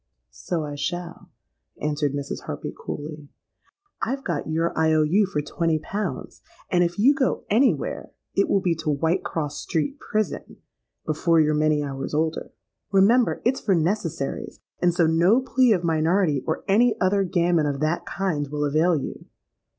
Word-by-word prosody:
'—'So 155 - -3
I 145 - -6
shall,' 175 +4 -5 0.5
answered 150 -1 -1
Mrs. 140 -1 -5
Harpy, - - -5
coolly. 150 -1 -7 0.7
'I've 270 +3 -2
got - - -3
your 165 +2 0
I. 160 0 +3
O. 155 0 +4
U. 190 +7 +3
for 150 -6 -2
twenty 165 +1 0
pounds; 200 +7 -5 0.3
and 175 -1 +4
if 175 +2 -2
you 250 +8 +5
go 270 -3 0
any 245 +6 +4
where, - - -6 0.2
it 200 - +1
will 195 - +2
be 180 -2 +1
to 160 -1 -3
Whitecross 160 0 -1
Street 195 - -2
prison, 215 -7 -3 0.5
before 160 +2 +2
you're 155 -1 +3
many 150 0 +2
hours 135 0 -4
older. 160 +1 -1 0.4
Remember, 220 +5 +3
it's 260 +2 +1
for 195 - +2
necessaries; 165 -4 -2 0.2
and 175 - +4
so 170 -1 +2
no 170 +8 +4
plea 255 -1 +2
of 180 -5 +2
minority 160 -2 +2
or 160 - -2
any 225 +3 +3
other 195 +1 +2
gammon 175 -4 +1
of 140 -1 -2
that 155 +3 0
kind, 175 -7 -2
will 150 +1 -2
avail 155 +4 +2
you.' - - -7
165 Hz, 165 wpm, -24 LUFS, 150-195 Hz, 0.7 s, you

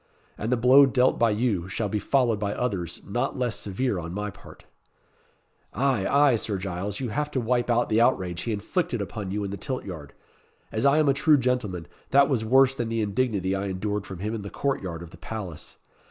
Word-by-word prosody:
And 110 +3 -3
the 125 - +3
blow 130 +4 +7
dealt 125 +1 +2
by 115 - +4
you, 105 -5 0
shall 105 +2 -2
be 105 +1 -1
followed 120 -3 +1
by 100 -1 -2
others 100 -9 -3
not - - -2
less 125 -3 0
severe 105 +1 -2
on 85 +1 -6
my 105 0 -3
part." - - -15 1.1
"Ay, 130 -7 +1
ay, 140 -4 +4
Sir 105 -2 -2
Giles, 95 +2 -4
you 130 -3 -3
have 150 +6 -2
to 140 - -1
wipe 120 +1 0
out 120 0 +2
the 110 +1 +2
outrage 90 -8 +1
he 115 - -3
inflicted 120 - -1
upon 100 0 -5
you 105 +2 -2
in 100 - -4
the 100 - -4
tilt 130 +2 -4
yard. 80 -7 -8 0.6
As 110 +5 +1
I 140 +2 +4
am 155 -1 +3
a 140 - +5
true 150 +2 +4
gentleman, 120 - -1 0.2
that 140 +1 +5
was 125 -6 +1
worse 130 +3 +5
than 120 -4 -3
the 115 -1 0
indignity 100 -3 0
I 95 +1 -2
endured 100 +2 -3
from 95 - -7
him 105 +5 -3
in 110 - -4
the 100 - -7
court 140 +5 -1
yard 85 -3 -5
of 85 - -11
the - - -13
palace. 90 -3 -7
110 Hz, 220 wpm, -26 LUFS, 95-125 Hz, 1.1 s, blow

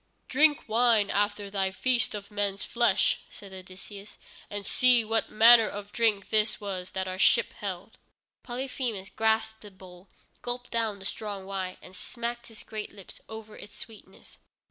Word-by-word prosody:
"Drink 295 +2 +3
wine 225 -2 +3
after 205 0 -1
thy 195 -1 0
feast 250 +4 +1
of 205 0 -8
men's 205 -1 -2
flesh," 235 -5 +2
said 200 -2 -13
Odysseus, 190 +2 -11 0.3
"and 205 -1 -5
see 245 0 +5
what 225 +1 0
manner 225 0 +7
of 205 0 -8
drink 220 -4 0
this 215 0 +2
was 185 -3 -5
that 190 0 -2
our 185 0 -5
ship - - +4
held." - - -7 0.4
Polyphemus 245 -5 -4
grasped 220 0 0
the 210 - -11
bowl, 185 -1 -16 0.3
gulped 245 0 -4
down 225 -3 -1
the 195 - -11
strong 200 -2 -5
wine, 190 -1 -5
and 185 - -13
smacked 235 +3 -5
his 220 -2 -13
great 215 -1 -7
lips 200 -2 -13
over 220 -1 -9
its 205 - -13
sweetness. 225 -2 -13
210 Hz, 160 wpm, -28 LUFS, 195-230 Hz, 0.4 s, manner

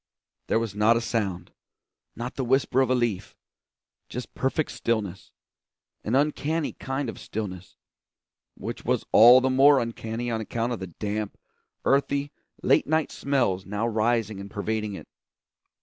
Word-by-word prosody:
There - - +2
was 115 -3 -2
not 105 +3 +4
a - - +1
sound, 100 -7 -2 0.6
not 120 +2 -5
the 135 - -3
whisper 130 +1 +2
of 130 - +1
a 130 - +3
leaf; 120 -6 -2 0.7
just 125 0 -6
perfect 135 +3 -1
stillness; 105 -6 -2 0.7
an 110 - 0
uncanny 150 +2 0
kind 135 0 -3
of 115 - -6
stillness, 95 -4 -6 0.8
which - - -6
was - - 0
all 120 +3 +9
the 130 +1 +1
more 140 +2 +6
uncanny 115 0 -3
on 110 -1 -1
account 115 +2 -2
of 120 - -4
the 95 - -5
damp, 105 +4 -4 0.5
earthy, 140 +1 +1 0.3
late - - +3
night 160 0 +1
smells 120 -10 0
now 105 +3 -2
rising 110 -2 0
and 100 +1 -8
pervading 105 0 -3
it. - - -10
115 Hz, 150 wpm, -26 LUFS, 105-130 Hz, 0.8 s, all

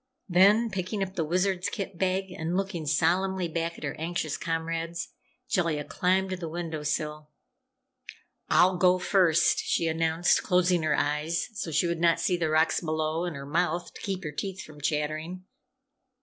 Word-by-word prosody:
Then, 205 +5 +5
picking 190 +2 -2
up 190 0 -5
the 170 - -1
Wizard's 180 +3 0
kit 195 -4 -6
bag 190 0 0
and 170 0 -2
looking 190 -5 -3
solemnly 180 +4 +1
back 165 +1 -3
at - - -11
her 140 - -2
anxious 160 -2 -2
comrades, 165 +1 -3 0.4
Jellia 165 - 0
climbed 185 +5 0
to - - 0
the 170 -2 -5
window 165 -2 -4
sill. 150 +1 -3 1.2
"I'll 185 0 +4
go 180 +1 +4
first," 180 -3 +3
she 170 - 0
announced, 165 +1 +2
closing 180 -1 +2
her 155 -1 +1
eyes 150 +6 -1
so 205 - -4
she 160 - +1
would 170 -1 -1
not 170 -1 +4
see 180 - +1
the 165 -2 -1
rocks 155 +1 +3
below, 155 0 -1
and 175 -4 -4
her 140 0 -7
mouth, 170 +3 -1
to - - -11
keep 195 -3 -3
her 150 - -4
teeth 190 +5 -5
from 150 -1 -13
chattering. 155 +4 -2
170 Hz, 170 wpm, -27 LUFS, 160-185 Hz, 1.2 s, Then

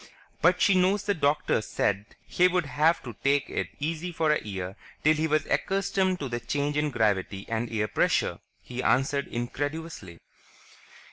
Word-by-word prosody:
"But 180 +2 +4
she 200 - +5
knows 185 +2 +3
the 205 - +1
doctor 150 - +1
said 100 -1 -2
he'd 180 +1 +3
have 155 +5 +2
to 120 - -7
take 140 0 +2
it - - -1
easy 165 +4 -3
for 160 -2 +1
a 150 - +1
year 95 -2 -5 0.3
till 155 - +6
he 155 +1 0
was 155 0 +1
accustomed 190 -1 0
to 140 - -2
the 120 -1 -3
change 145 +4 -2
in 150 0 +1
gravity 105 -5 0
and 115 0 -2
air 105 -2 0
pressure," - - +1 0.2
he 125 0 -5
answered 140 +2 +1
incredulously. 145 - -4
145 Hz, 160 wpm, -27 LUFS, 120-165 Hz, 0.3 s, till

